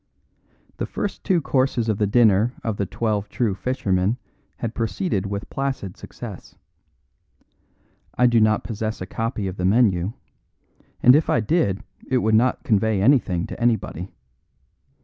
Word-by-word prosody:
The - - -3
first 205 - -4
two 185 -4 +2
courses 130 -4 +1
of 110 -2 0
the 105 - +2
dinner 110 +1 +4
of 110 -3 -2
The 100 - -1
Twelve 105 -1 -2
True 115 -3 0
Fishermen 100 -1 0 0.4
had 115 -1 -4
proceeded 115 - -1
with 100 0 -4
placid 135 -9 -3
success. - - -10 1.6
I 125 - +4
do 120 -2 +4
not 110 0 +3
possess 110 -1 -4
a 95 - -4
copy 115 +1 -3
of 95 0 -4
the 90 - -1
menu; 100 -2 +3 0.9
and 125 +2 +8
if 155 - +2
I - - +3
did 110 - 0 0.3
it 130 - +2
would 110 -2 +1
not 120 +4 +3
convey 110 -1 +2
anything 100 -7 +3
to - - -8
anybody. 110 -6 0
110 Hz, 150 wpm, -23 LUFS, 100-125 Hz, 1.6 s, and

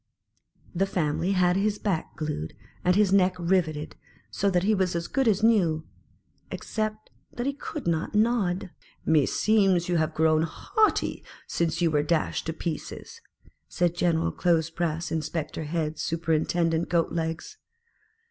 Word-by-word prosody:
The 190 +2 +1
family 175 +1 0
had 180 -1 +3
his 205 +2 +1
back 190 -6 -2
glued, 150 - -4 0.3
and 180 0 +3
his 200 -2 +3
neck 185 -2 +4
riveted, 170 -4 0 0.4
so 200 - +1
that 180 -2 +1
he 215 +3 +3
was 185 -3 0
as 170 0 -2
good 270 -2 0
as 215 -1 +2
new, 175 -9 +3 0.6
except 215 -1 -4 0.2
that 240 - -4
he 280 - 0
could 285 +1 -7
not 165 +3 -1
nod. 210 -5 +1 0.2
" - - -33
Meseems, 185 +4 +3
you 175 - +2
have 160 0 0
grown 155 0 +3
haughty 425 - 0 0.2
since 170 +1 -1
you 165 - +3
were 150 -1 +3
dashed 155 +2 -1
to 160 - -1
pieces," 160 -1 -6 0.5
said 175 -1 +1
General 165 -2 +1
clothes 165 -2 +1
press 165 0 -2
inspector 155 0 -3
head 155 -1 -2
super 165 0 -1
intendent 165 +1 +1
Goat 170 -2 +1
legs. 165 - -4
170 Hz, 150 wpm, -26 LUFS, 160-195 Hz, 0.6 s, neck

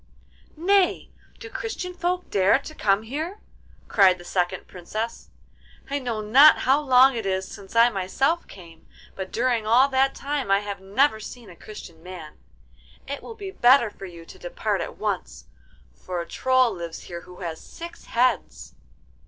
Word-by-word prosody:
'Nay! 380 +3 +2 0.3
do 465 - -9
Christian 430 -5 -5
folk 360 +1 -2
dare 195 +4 +4
to 285 +3 -10
come 205 -6 +1
here?' 315 - -5 0.5
cried 190 -3 +5
the 175 - -12
second 175 -1 -1
Princess. 215 +6 -6 0.6
'I 285 - 0
know 235 -5 -3
not 265 +9 +7
how 270 +3 +4
long 265 -1 +6
it 225 -4 -3
is 190 0 -1
since 200 +1 -12
I 235 +1 +6
myself 270 - 0
came, 165 -4 -14 0.3
but 190 -1 -6
during 235 -2 0
all 245 +5 +5
that 270 0 +2
time 280 -5 -3
I 195 +1 +4
have 200 -2 -6
never 220 +5 +2
seen 220 -1 -10
a - - -14
Christian 170 -4 -11
man. 175 -3 -10 0.7
It 280 +1 -5
will 455 - -9
be 400 -3 -7
better 245 - +5
for 195 - -9
you 170 -2 -12
to - - -14
depart - - -2
at - - -6
once, - - -4 0.5
for 180 -1 -6
a 170 - -4
Troll 255 0 +2
lives 170 -2 -7
here 170 -1 -8
who 180 +2 -14
has 165 -2 -5
six 340 0 -10
heads. 250 +2 0
230 Hz, 170 wpm, -24 LUFS, 190-280 Hz, 0.7 s, not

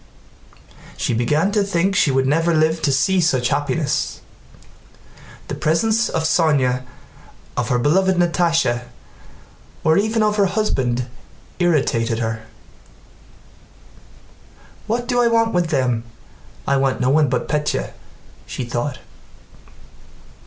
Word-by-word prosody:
She - - -1
began 150 - +1
to 210 0 +1
think 195 0 0
she 160 - +3
would 135 0 +1
never 165 +4 +2
live 160 +1 +2
to 140 - +1
see 185 +7 +2
such 130 -7 +1
happiness. 145 +1 -1 1.3
The - - -5
presence 220 +9 +1
of 160 - -1
Sónya, 145 -6 +2 0.7
of - - -2
her 125 - +2
beloved 185 +9 +2
Natásha, 165 -8 +1 1.0
or 160 +4 +4
even 220 +1 +1
of 210 0 +1
her 200 -1 +3
husband 130 - -1 0.5
irritated 135 -10 +1
her. 115 -1 -4 2.4
"What 240 +2 -2
do 245 -1 +2
I 240 - +3
want 230 -1 +2
with 175 -1 +1
them? 125 -6 0 0.6
I 140 - +2
want 135 -1 0
no 125 +1 +2
one 150 -1 +3
but 125 - -1
Pétya," 150 - -1 0.6
she - - -5
thought. 120 +3 -3
155 Hz, 120 wpm, -20 LUFS, 130-190 Hz, 2.4 s, or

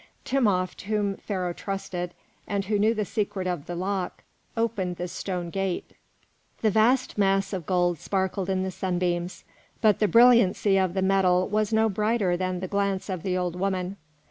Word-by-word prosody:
Timopht, 200 -9 +1
whom 205 -1 0
Pharaoh 185 -4 -3
trusted, 180 -2 -4 0.3
and 200 -1 -1
who 210 +1 0
knew 220 +3 +3
the 210 -1 -1
secret 200 -2 -2
of 175 -5 -3
the 175 - -4
lock, 185 +1 -3 0.3
opened 205 -6 -1
the 175 +1 -4
stone 175 -1 -4
gate. 195 -1 -2 0.7
The 215 - +4
vast 235 +3 +2
mass 195 0 +2
of 180 -4 -4
gold 175 -3 +1
sparkled 190 -1 -1
in 190 -1 +1
the 190 - -2
sunbeams, 180 -1 -2 0.4
but 215 -3 +3
the 210 - +3
brilliancy 230 -4 +5
of 185 -1 0
the 190 - +1
metal 185 -1 +3
was 215 0 0
no 220 0 +3
brighter 210 -2 +1
than 185 0 -2
the 185 - -3
glance 200 0 -1
of 185 -3 -3
the 185 0 -1
old 180 -1 -2
woman. 185 0 -2
190 Hz, 170 wpm, -26 LUFS, 180-210 Hz, 0.7 s, brilliancy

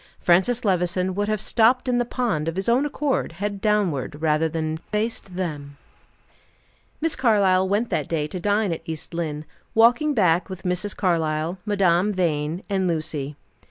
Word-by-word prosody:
Francis 220 +8 +2
Levison 185 -1 +1
would 205 +2 -1
have 215 -1 0
stopped 240 +5 +3
in 245 -1 +2
the 245 - +1
pond, 225 - -1
of 165 - -2
his 190 +1 -2
own 250 +5 +3
accord, 290 -1 -1
head 200 0 -4
downward, 185 - 0
rather 155 0 +1
than 155 0 -2
face 215 +6 -2
them. 155 -7 -6 1.2
Miss 325 0 0
Carlyle 195 -6 +3
went 210 +4 0
that 150 - -1
day 155 -3 0
to 180 +4 -5
dine 205 0 +1
at 165 - -6
East 160 +1 -6
Lynne, 155 -3 -3 0.3
walking 245 +7 +4
back 180 -5 +2
with 185 -1 -8
Mrs. 180 +3 -2
Carlyle, 165 -1 0
Madame 195 -1 +2
Vine 165 -1 -1
and 190 -2 0
Lucy. 155 -4 -3
185 Hz, 160 wpm, -23 LUFS, 160-210 Hz, 1.2 s, walking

